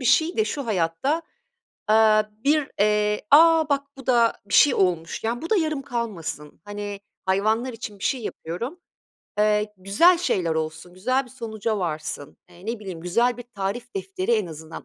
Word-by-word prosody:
bir 255 Hz, -, -6 dB
şeyi 320 Hz, +8 st, +3 dB
de 435 Hz, -, +3 dB
şu 280 Hz, -, -4 dB
hayatta, 210 Hz, -, 0 dB, 0.7 s
aaa, 215 Hz, 0 st, +5 dB, 0.2 s
bir, 295 Hz, 0 st, +2 dB
eee, 210 Hz, 0 st, +2 dB
"A, 320 Hz, +1 st, +7 dB
bak 280 Hz, 0 st, 0 dB
bu 270 Hz, -1 st, -12 dB
da 235 Hz, -2 st, +4 dB
bir 205 Hz, -, -2 dB
şey 285 Hz, -4 st, +6 dB
olmuş." 175 Hz, 0 st, 0 dB
yani, 235 Hz, +4 st, -1 dB
bu 330 Hz, -, -5 dB
da 435 Hz, -, +4 dB
yarım 310 Hz, -5 st, 0 dB
kalmasın, 175 Hz, -, -5 dB
hani, 205 Hz, -1 st, -6 dB, 0.3 s
hayvanlar 215 Hz, +6 st, +1 dB
için 220 Hz, -3 st, -8 dB
bir -, -, -6 dB
şey 260 Hz, -, 0 dB
yapıyorum, 230 Hz, -, -5 dB, 0.6 s
eee, 210 Hz, 0 st, +2 dB
güzel 210 Hz, -, +4 dB
şeyler 175 Hz, -, 0 dB
olsun, 160 Hz, +2 st, -4 dB
güzel 255 Hz, +8 st, 0 dB
bir 250 Hz, -, -16 dB
sonuca 220 Hz, -3 st, -3 dB
varsın. 155 Hz, -5 st, -4 dB
Eee, 175 Hz, +2 st, -15 dB
ne 230 Hz, +1 st, -2 dB
bileyim, 190 Hz, -5 st, -7 dB
güzel 235 Hz, +9 st, +1 dB
bir 245 Hz, -, -8 dB
tarif 200 Hz, -, -4 dB
defteri 385 Hz, -4 st, -2 dB
en 215 Hz, -4 st, +2 dB
azından 160 Hz, 0 st, -9 dB
215 Hz, 175 wpm, -24 LUFS, 190-265 Hz, 0.7 s, A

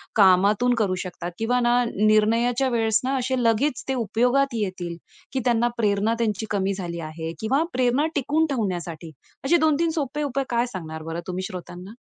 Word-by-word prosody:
कामातून 205 Hz, +4 st, +4 dB
करू 185 Hz, -3 st, +1 dB
शकतात? 175 Hz, -1 st, -6 dB
किंवा 245 Hz, +3 st, +1 dB
ना 245 Hz, 0 st, +3 dB
निर्णयाच्या 230 Hz, +5 st, +3 dB
वेळेस 225 Hz, -2 st, +2 dB
ना, 265 Hz, +2 st, 0 dB
असे 260 Hz, +1 st, -1 dB
लगेच 235 Hz, +4 st, +1 dB
ते 265 Hz, -, 0 dB
उपयोगात 250 Hz, +4 st, +1 dB
येतील 185 Hz, -5 st, -3 dB, 0.4 s
की 265 Hz, -, 0 dB
त्यांना 240 Hz, -1 st, +3 dB
प्रेरणा 210 Hz, 0 st, +1 dB
त्यांची 220 Hz, -1 st, -1 dB
कमी 195 Hz, -1 st, 0 dB
झाली 175 Hz, -3 st, -5 dB
आहे 160 Hz, +1 st, -5 dB
किंवा 265 Hz, +8 st, +1 dB
प्रेरणा 255 Hz, +3 st, +2 dB
टिकवून 295 Hz, +3 st, +1 dB
ठेवण्यासाठी 175 Hz, -, -3 dB, 0.3 s
असे 345 Hz, +5 st, +4 dB
2-3 315 Hz, +1 st, +2 dB
सोपे 290 Hz, +2 st, -2 dB
उपाय 275 Hz, -1 st, -1 dB
काय 235 Hz, 0 st, +1 dB
सांगणार 160 Hz, -3 st, -6 dB
बरं 165 Hz, +1 st, -4 dB
तुम्ही 185 Hz, 0 st, -3 dB
श्रोत्यांना? 180 Hz, +3 st, -9 dB
225 Hz, 165 wpm, -24 LUFS, 185-250 Hz, 0.4 s, कामातून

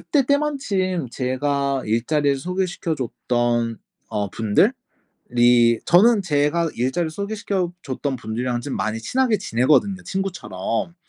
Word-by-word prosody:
그때 280 Hz, -4 st, +1 dB
때마침 210 Hz, -, 0 dB
제가 140 Hz, +2 st, -1 dB
일자리를 140 Hz, +5 st, +1 dB
소개시켜 180 Hz, +1 st, -2 dB
줬던 120 Hz, -3 st, -1 dB, 0.3 s
어 100 Hz, -2 st, -2 dB
분들이 120 Hz, -, +1 dB
저는 205 Hz, +4 st, +5 dB
제가 155 Hz, 0 st, +1 dB
일자리를 155 Hz, +7 st, -1 dB
소개시켜 200 Hz, -1 st, -2 dB
줬던 135 Hz, 0 st, -3 dB
분들이랑 120 Hz, +1 st, -3 dB
좀 140 Hz, +2 st, -4 dB
많이 110 Hz, +1 st, -2 dB
친하게 245 Hz, -, +1 dB
지내거든요, 180 Hz, -, +2 dB
친구처럼. 170 Hz, -, -3 dB
145 Hz, 290 characters per minute, -22 LUFS, 120-190 Hz, 0.3 s, 저는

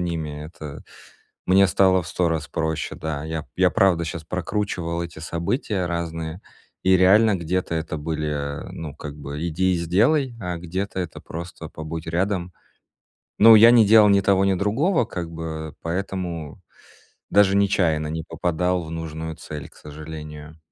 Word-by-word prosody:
ними, 80 Hz, -4 st, -3 dB
это 75 Hz, -3 st, -9 dB, 0.6 s
мне 95 Hz, +1 st, +5 dB
стало 95 Hz, +1 st, +3 dB
в -, -, -11 dB
100 90 Hz, -2 st, 0 dB
раз 80 Hz, -3 st, -2 dB
проще. 80 Hz, -1 st, -2 dB
Да, 80 Hz, -2 st, -4 dB
я 80 Hz, 0 st, -3 dB
п -, -, -22 dB
я 90 Hz, -1 st, +4 dB
правда 95 Hz, -5 st, +3 dB
щас 80 Hz, 0 st, -5 dB
прокручивал 85 Hz, -2 st, -2 dB
эти 85 Hz, -2 st, -8 dB
события 90 Hz, -, -2 dB
разные, 85 Hz, 0 st, -4 dB, 0.4 s
и 95 Hz, 0 st, +5 dB
реально 105 Hz, +3 st, +5 dB
где-то 85 Hz, 0 st, -2 dB
это 80 Hz, -1 st, -3 dB
были, 75 Hz, -2 st, -3 dB
ну, 75 Hz, -3 st, -7 dB
как 75 Hz, -1 st, -8 dB
бы 75 Hz, +3 st, -5 dB
"иди 95 Hz, +3 st, +1 dB
и -, -, 0 dB
сделай", 115 Hz, -, +2 dB
а 90 Hz, -2 st, -4 dB
где-то 95 Hz, +3 st, -4 dB
это 85 Hz, -3 st, -6 dB
просто 85 Hz, +2 st, -8 dB
"побудь 80 Hz, +1 st, -7 dB
рядом". 90 Hz, +1 st, -1 dB, 0.9 s
Ну, 110 Hz, +1 st, +9 dB
я 115 Hz, +2 st, +9 dB
не 115 Hz, -3 st, +6 dB
делал 105 Hz, -1 st, +7 dB
ни 100 Hz, -, +5 dB
того, 95 Hz, 0 st, +3 dB
ни 95 Hz, -, +3 dB
другого 120 Hz, -, +1 dB
как 85 Hz, -4 st, -6 dB
бы, 80 Hz, -2 st, -6 dB
поэтому 90 Hz, -2 st, -4 dB, 0.7 s
даже 100 Hz, -1 st, +4 dB
нечаянно 85 Hz, -6 st, +2 dB
не 80 Hz, +1 st, -4 dB
попадал 90 Hz, +1 st, -1 dB
в 80 Hz, -, -9 dB
нужную 80 Hz, -1 st, -5 dB
цель, 75 Hz, -2 st, -8 dB
к -, -, -22 dB
сожалению. 75 Hz, 0 st, -9 dB
85 Hz, 160 wpm, -23 LUFS, 80-95 Hz, 0.9 s, Ну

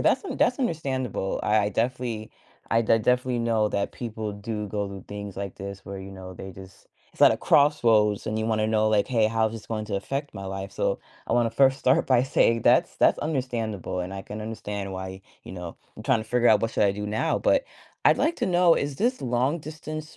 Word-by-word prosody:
that's -, -, +2 dB
un 385 Hz, -, -4 dB
that's 245 Hz, -, +2 dB
understandable, 130 Hz, -, -2 dB
I 105 Hz, -1 st, +2 dB
definitely 115 Hz, 0 st, -2 dB, 0.4 s
I 115 Hz, -, +4 dB
de 115 Hz, 0 st, +3 dB
definitely 125 Hz, +2 st, +1 dB
know 115 Hz, -2 st, +2 dB
that 100 Hz, -1 st, -2 dB
people 110 Hz, -3 st, -5 dB
do 105 Hz, +1 st, -5 dB
go 105 Hz, 0 st, -2 dB
through 100 Hz, -1 st, -9 dB
things 100 Hz, -1 st, -7 dB
like 100 Hz, -1 st, -5 dB
this 100 Hz, 0 st, -8 dB
where, 100 Hz, 0 st, -7 dB
you 95 Hz, +1 st, -8 dB
know, 95 Hz, -1 st, -9 dB
they 95 Hz, +1 st, -9 dB
just 95 Hz, +1 st, -14 dB, 0.3 s
It's -, -, -20 dB
at -, -, +8 dB
a -, -, -1 dB
crossroads, 115 Hz, -8 st, +3 dB
and 110 Hz, 0 st, -1 dB
you 110 Hz, -, -1 dB
wanna 110 Hz, -1 st, +1 dB
know, 110 Hz, 0 st, +2 dB
like, 105 Hz, -2 st, +2 dB
"Hey, 115 Hz, -4 st, +2 dB
how 110 Hz, 0 st, +1 dB
is -, -, -10 dB
this 110 Hz, -2 st, -8 dB
going 110 Hz, -2 st, -3 dB
to 105 Hz, -, -2 dB
affect 140 Hz, +8 st, -4 dB
my 95 Hz, 0 st, -7 dB
life?" 95 Hz, 0 st, -5 dB
So -, -, -1 dB, 0.3 s
I 115 Hz, -, 0 dB
wanna 120 Hz, -1 st, +2 dB
first 135 Hz, +3 st, +3 dB
start 130 Hz, +1 st, +3 dB
by 125 Hz, -2 st, +4 dB
saying 115 Hz, -4 st, +2 dB
that's -, -, +3 dB
that's -, -, +4 dB
understandable, 115 Hz, -, -2 dB
and 90 Hz, +2 st, -5 dB
I 95 Hz, -, -6 dB
can 105 Hz, +2 st, -7 dB
understand 105 Hz, -3 st, -5 dB
why, 95 Hz, 0 st, -6 dB, 0.2 s
you -, -, -10 dB
know, 90 Hz, -2 st, -7 dB, 0.2 s
"I'm -, -, -10 dB
tryna 110 Hz, -, +2 dB
figure 120 Hz, 0 st, +2 dB
out -, -, +5 dB
what 115 Hz, -, 0 dB
should 105 Hz, -, +2 dB
I 100 Hz, -, +4 dB
do 105 Hz, +1 st, -5 dB
now." 105 Hz, +1 st, 0 dB
But -, -, +2 dB, 0.4 s
I'd -, -, +6 dB
like 335 Hz, -, +1 dB
to -, -, -1 dB
know, 175 Hz, -1 st, +5 dB
is 140 Hz, -1 st, -2 dB
this 245 Hz, -, 0 dB
long-distance 155 Hz, +5 st, -3 dB
110 Hz, 225 wpm, -26 LUFS, 100-130 Hz, 0.4 s, at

